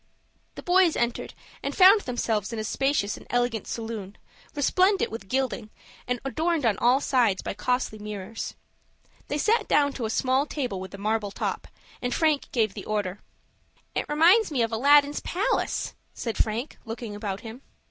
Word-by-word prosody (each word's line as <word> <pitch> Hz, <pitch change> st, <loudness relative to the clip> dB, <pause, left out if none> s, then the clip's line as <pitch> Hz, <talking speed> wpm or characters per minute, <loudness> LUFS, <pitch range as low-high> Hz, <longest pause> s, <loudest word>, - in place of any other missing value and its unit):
The -, -, -8 dB
boys 360 Hz, -2 st, +4 dB
entered, 235 Hz, 0 st, -2 dB, 0.3 s
and -, -, -4 dB
found 395 Hz, +2 st, +8 dB
themselves 230 Hz, -, -1 dB
in 230 Hz, -, -4 dB
a 215 Hz, -, -2 dB
spacious 270 Hz, -3 st, 0 dB
and -, -, -14 dB
elegant 245 Hz, -3 st, 0 dB
saloon, 220 Hz, -4 st, -5 dB, 0.4 s
resplendent 370 Hz, +7 st, +2 dB
with 220 Hz, -3 st, -7 dB
gilding, 255 Hz, -4 st, -1 dB, 0.4 s
and 250 Hz, 0 st, -1 dB
adorned 315 Hz, +1 st, 0 dB
on 220 Hz, -3 st, +2 dB
all 250 Hz, +3 st, +4 dB
sides 245 Hz, -8 st, +2 dB
by -, -, -3 dB
costly 215 Hz, +1 st, -1 dB
mirrors. 210 Hz, +1 st, -6 dB, 0.7 s
They 290 Hz, -, -2 dB
sat 435 Hz, +7 st, +2 dB
down 285 Hz, -1 st, +3 dB
to 245 Hz, -, -4 dB
a -, -, -2 dB
small 260 Hz, +5 st, +1 dB
table 250 Hz, -12 st, -3 dB
with 190 Hz, +1 st, -7 dB
a -, -, -9 dB
marble 210 Hz, +1 st, -1 dB
top, -, -, -3 dB, 0.3 s
and 245 Hz, 0 st, -1 dB
Frank 310 Hz, -3 st, +1 dB
gave 220 Hz, -5 st, +1 dB
the 200 Hz, -, -8 dB
order. 205 Hz, -2 st, -2 dB, 0.7 s
"It -, -, -2 dB
reminds 345 Hz, +9 st, +5 dB
me 265 Hz, -6 st, +1 dB
of 230 Hz, -, -1 dB
Aladdin's 285 Hz, +5 st, +4 dB
palace," 380 Hz, +4 st, -1 dB, 0.2 s
said 230 Hz, -3 st, -3 dB
Frank, 230 Hz, +6 st, -2 dB
looking 225 Hz, -2 st, -6 dB
about 205 Hz, -2 st, -4 dB
him. 230 Hz, +3 st, -9 dB
245 Hz, 170 wpm, -26 LUFS, 215-290 Hz, 0.7 s, found